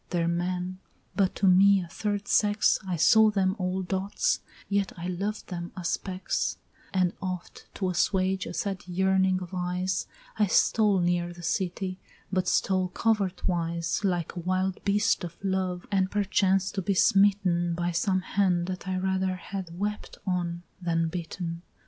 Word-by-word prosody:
there 170 -2 0
men! 180 +2 -2 0.4
but 195 -2 +2
to 200 - 0
me 195 +2 +6
a 175 - -5
third 205 +3 -3
sex 205 0 +3
I 180 - -1
saw 220 +7 +6
them 190 -2 +1
all 185 +1 -1
dots 195 - 0 0.3
yet 200 -1 0
I 170 - -6
loved 195 +4 -3
them 175 -2 -5
as 175 -2 -2
specks: 185 +2 -2 0.3
And 185 -2 +2
oft 185 -2 -6
to 190 - -1
assuage 185 +1 +1
a - - -6
sad 195 -2 -2
yearning 190 0 +2
of 175 - -10
eyes 180 +1 -1 0.3
I 210 - +4
stole 205 0 +3
near 175 0 +1
the 175 0 -12
city, 185 +1 -2 0.3
but 185 -1 +1
stole 185 -1 +2
covert 200 -1 0
wise 170 0 -1
Like 175 -4 -1
a - - -4
wild 185 +2 -1
beast 205 -1 +2
of 170 -1 -6
love, 185 -2 -1
and 190 -2 +2
perchance 195 -1 +2
to 195 - -2
be 195 +2 0
smitten 185 -3 +3
By 175 +1 -1
some 185 +2 +1
hand 185 -2 +1
that 185 0 -5
I 185 0 -1
rather 190 0 0
had 180 -2 -7
wept 210 +2 -4
on 175 -2 -2 0.2
than 165 -1 0
bitten! 170 0 -5
185 Hz, 160 wpm, -27 LUFS, 175-195 Hz, 0.4 s, me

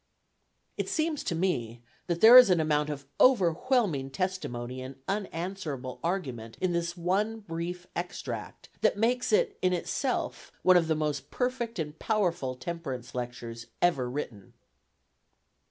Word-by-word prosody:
It - - -2
seems 315 -2 0
to 170 - -1
me 120 -10 -1 0.2
that 170 -1 -1
there 230 +3 +10
is 250 -4 +11
an 180 -2 +4
amount 150 -1 +1
of 140 -2 -5
overwhelming 195 - +3
testimony 130 -7 -3
and 130 +1 -7
unanswerable 175 -9 -4
argument 130 -11 -3
in 185 -1 0
this 170 +1 -2
one 205 +6 0
brief 175 -1 -5
extract, 175 +1 -5
that - - +3
makes 245 +3 +1
it 445 -1 +2
in 185 0 +2
itself 250 +8 -2
one 185 - +6
of 170 -2 +4
the 160 - +2
most 150 -2 -2
perfect 245 -3 -2
and 155 -2 -4
powerful 175 - 0
temperance 130 -3 -5
lectures 120 -1 -6
ever 140 -8 +2
written. 125 -7 -6
170 Hz, 140 wpm, -29 LUFS, 135-195 Hz, 0.2 s, is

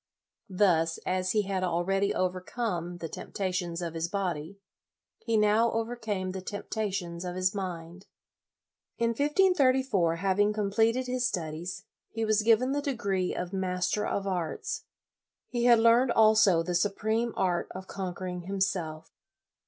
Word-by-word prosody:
Thus, 170 -4 +2
as 185 0 0
he 210 -1 +2
had 190 -1 -2
already 190 +3 +1
overcome 180 -1 -2
the 170 - -5
tempta 185 +3 -4
tions 175 -1 -2
of 165 -1 -4
his 165 0 -2
body, 180 -2 -3 0.6
he 230 -2 0
now 215 +2 +3
overcame 225 -5 -2
the 190 0 -5
temptations 195 -3 -4
of 180 0 -4
his 185 +2 +1
mind. 180 -2 -6 0.9
In 230 0 +1
1534, 265 - +2
having 200 +4 +2
completed 225 +4 +1
his 250 0 0
studies, 175 +1 -5 0.2
he 225 0 -2
was 215 0 +2
given 230 +4 +3
the 285 +1 0
degree 200 -10 -1
of 180 +1 -4
Master 185 +2 -1
of 200 - -2
Arts. 180 -4 -3 0.6
He 240 -1 -1
had 240 -1 +7
learned 230 +3 +5
also 215 -6 +5
the 180 +1 -3
supreme 220 +5 0
art 180 -2 0
of 185 +1 -8
conquering 185 -2 -5
him 195 +3 -5
self. 165 -5 -2
195 Hz, 140 wpm, -29 LUFS, 180-225 Hz, 0.9 s, had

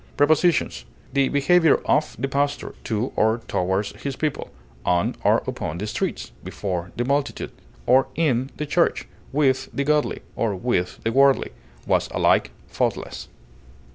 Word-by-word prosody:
Prepositions: 155 +4 +2 0.3
The 140 -1 +3
behavior 160 +3 +4
of 150 0 +1
the 135 - -1
pastor 140 +1 -1
to 115 +3 -2
or 110 +2 +2
toward 95 +3 0 0.2
his 140 -2 -3
people, 150 0 -2 0.3
on 90 -1 +1
or - - +3
upon 80 - -4
the 100 - -3
streets, 105 - -3
before 90 -3 -4
the 120 - -1
multitude, 140 +2 -1 0.3
or 130 +2 +4
in 135 -5 +1
the 150 - -2
church, 170 +3 +1 0.2
with 135 -2 +1
the 140 - -1
godly, 150 +1 +1
or 110 -4 0
with 90 -3 -1
the 115 - 0
worldly, 135 +2 +4 0.3
was - - +1
alike - - +3 0.2
faultless. - - -3
135 Hz, 140 wpm, -23 LUFS, 110-145 Hz, 0.3 s, behavior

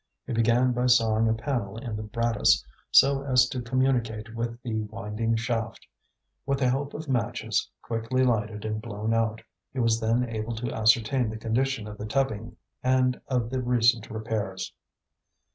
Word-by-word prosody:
He - - -4
began 120 +2 +3
by 125 +1 +1
sawing 115 -2 +4
a - - +3
panel 115 -5 -3
in 115 -2 -5
the 105 - -4
brattice 110 - +2 0.2
so 135 0 +6
as 125 -2 +4
to 130 -3 -3
communicate 120 -3 0
with 115 0 -3
the 120 - -3
winding 110 +1 -2
shaft. 115 0 -2 0.6
With 140 0 0
the 130 -2 +2
help 140 +2 -2
of 155 +1 -6
matches, 125 -4 -1
quickly 115 +3 0
lighted 110 -3 0
and 110 0 -2
blown 110 0 -3
out, 115 -1 0 0.3
he 130 - -5
was 115 -1 +2
then 115 +2 +1
able 115 0 -4
to 115 +2 -4
ascertain 115 +2 +3
the 110 - -5
condition 115 +1 -1
of 105 0 -9
the 105 - -4
tubbing 115 -2 -1 0.3
and 130 0 +2
of 125 -3 -1
the 130 -1 -1
recent 120 -2 +2
repairs. 110 -4 -3
115 Hz, 165 wpm, -27 LUFS, 110-125 Hz, 0.6 s, so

